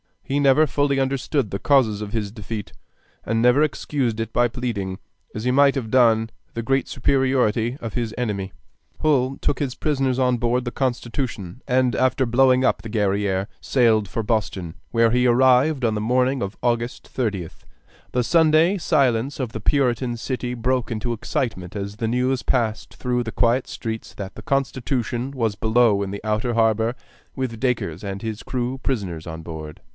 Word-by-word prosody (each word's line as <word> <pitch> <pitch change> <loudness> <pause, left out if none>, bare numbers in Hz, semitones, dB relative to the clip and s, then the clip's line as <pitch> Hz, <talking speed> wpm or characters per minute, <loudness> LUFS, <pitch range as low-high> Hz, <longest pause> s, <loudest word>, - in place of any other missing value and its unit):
He 140 +1 -1
never 140 +2 +5
fully 145 +1 +1
understood 135 -2 0
the 100 - -3
causes 115 -7 +3
of 105 -1 -6
his 105 -3 -2
defeat, 105 -1 -6 0.5
and 115 +1 0
never 125 +4 +5
excused 135 -5 0
it 115 0 -3
by 120 0 +3
pleading, 115 -7 -3 0.4
as 110 - -4
he 125 - +1
might 140 +1 +5
have 115 -5 -3
done, 115 -3 +4 0.2
the 115 - -3
great 135 +2 +1
superiority 130 -3 +1
of 115 -3 -5
his 115 -2 -3
enemy. 100 -5 -2 0.5
Hull 135 -3 +2
took 140 - 0
his 135 -4 -2
prisoners 135 -4 0
on 125 -1 +2
board 120 +2 0
the 120 - -4
Constitution, 120 -5 -3
and 125 -3 +2
after 130 +1 +2
blowing 130 +2 +4
up - - +2
the 110 - -8
Guerrière 100 -2 0
sailed 115 -5 +2
for 115 +4 -3
Boston, 105 -6 -2 0.2
where 115 -1 +3
he 125 +1 +3
arrived 130 +3 +4
on 110 -2 +2
the 105 - -2
morning 125 +3 +1
of 100 +1 -4
August 120 0 -1
30th. 100 -10 -3 0.5
The 125 - +2
Sunday 165 +5 +4
silence 135 -5 +1
of 125 -4 -2
the 110 - -5
Puritan 125 0 +1
city 125 +1 -3
broke 125 +1 -1
into 120 +1 -3
excitement 105 -5 -3
as 100 0 -5
the 115 0 -1
news 125 +2 +1
passed 115 -4 -1
through 125 -1 -1
the 115 - -6
quiet 120 +2 +2
streets 110 -1 -5
that 100 -1 -7
the - - -9
Constitution 130 -2 -1
was 115 -6 -1
below 110 -1 +3
in 100 - -2
the 100 +1 -6
outer 110 +3 0
harbor 115 +1 +2 0.4
with 125 -4 -3
Dacres 115 -9 -1
and 100 -1 -5
his 110 -1 -5
crew 125 +1 -3
prisoners 95 -13 -3
on 80 0 -6
board. 80 -2 -8
120 Hz, 175 wpm, -23 LUFS, 110-130 Hz, 0.5 s, never